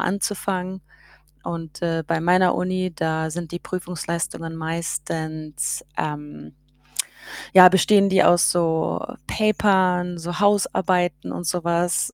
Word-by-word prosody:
anzufangen. 190 Hz, -1 st, -2 dB, 0.6 s
Und, 165 Hz, -3 st, -6 dB
äh, 165 Hz, -1 st, 0 dB
bei 165 Hz, 0 st, 0 dB
meiner 180 Hz, +2 st, +3 dB
Uni, 185 Hz, 0 st, -1 dB
da 160 Hz, 0 st, -1 dB
sind 170 Hz, 0 st, -6 dB
die 175 Hz, -, -5 dB
Prüfungsleistungen 170 Hz, -2 st, -5 dB
meistens 155 Hz, -2 st, -4 dB
ähm, 150 Hz, -, -5 dB, 1.0 s
ja, 180 Hz, -1 st, +10 dB
bestehen 195 Hz, +2 st, +4 dB
die 190 Hz, -1 st, +4 dB
aus 175 Hz, -1 st, +5 dB
so 165 Hz, -2 st, 0 dB, 0.2 s
Papern, 190 Hz, -4 st, +2 dB
so 175 Hz, +1 st, -5 dB
Hausarbeiten 185 Hz, -5 st, +1 dB
und 175 Hz, -, -5 dB
so 175 Hz, +1 st, -1 dB
was 170 Hz, +1 st, 0 dB
175 Hz, 115 wpm, -22 LUFS, 160-185 Hz, 1.0 s, ja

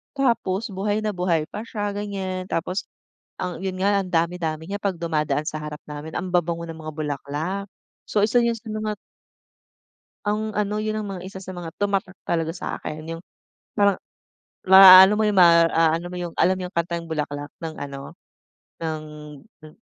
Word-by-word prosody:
Tapos 230 Hz, -6 st, 0 dB
buhay 205 Hz, +2 st, -1 dB
na 215 Hz, -, 0 dB
buhay 180 Hz, -4 st, 0 dB
pa 210 Hz, -, -5 dB
siya 205 Hz, -2 st, -3 dB
ganyan 195 Hz, -2 st, -4 dB
tapos 180 Hz, +2 st, -2 dB, 0.5 s
ang 180 Hz, -2 st, -3 dB
yun 190 Hz, -1 st, -2 dB
nga 200 Hz, 0 st, +3 dB
ang 190 Hz, -, -6 dB
dami-dami 165 Hz, -2 st, 0 dB
niya 205 Hz, +1 st, -3 dB
pag 195 Hz, -2 st, 0 dB
dumadaan 155 Hz, -3 st, 0 dB
sa 155 Hz, -, -3 dB
harap 150 Hz, 0 st, -6 dB
namin 150 Hz, +2 st, -7 dB
ang 185 Hz, -, -3 dB
babango 170 Hz, -1 st, +1 dB
ng 165 Hz, -, -6 dB
mga 155 Hz, -1 st, -7 dB
bulaklak. 155 Hz, +6 st, -3 dB, 0.4 s
So, 205 Hz, -, +1 dB
isa 235 Hz, +3 st, +3 dB
yun 235 Hz, -1 st, +1 dB
sa 225 Hz, -, -18 dB
mga 215 Hz, -1 st, -3 dB, 1.3 s
Ang 215 Hz, +1 st, -2 dB
ano 210 Hz, 0 st, 0 dB
yun 215 Hz, 0 st, -2 dB
ang 210 Hz, -, -5 dB
mga 180 Hz, -, -9 dB
isa 190 Hz, 0 st, -8 dB
sa 185 Hz, -, -7 dB
mga 175 Hz, -3 st, -7 dB
tumatak 195 Hz, -2 st, -1 dB
talaga 165 Hz, -1 st, -1 dB
sa'kin 155 Hz, -3 st, -5 dB
yung -, -, -12 dB, 0.5 s
parang 200 Hz, -2 st, +3 dB, 0.7 s
ma-aano 190 Hz, +1 st, +10 dB
mo 215 Hz, -, +1 dB
yung 210 Hz, -2 st, +1 dB
ma-aano 165 Hz, -1 st, +5 dB
mo 180 Hz, -, -6 dB
yung 175 Hz, -2 st, -5 dB
alam 185 Hz, +1 st, +3 dB
niyo 180 Hz, -, -3 dB
kantang 170 Hz, 0 st, -2 dB
Bulaklak 145 Hz, -2 st, -4 dB
ng 160 Hz, -1 st, -5 dB
ano 140 Hz, -1 st, -7 dB, 0.7 s
ng 160 Hz, -2 st, -3 dB, 0.6 s
hmm. 155 Hz, -, -15 dB
180 Hz, 170 wpm, -23 LUFS, 160-205 Hz, 1.3 s, ma-aano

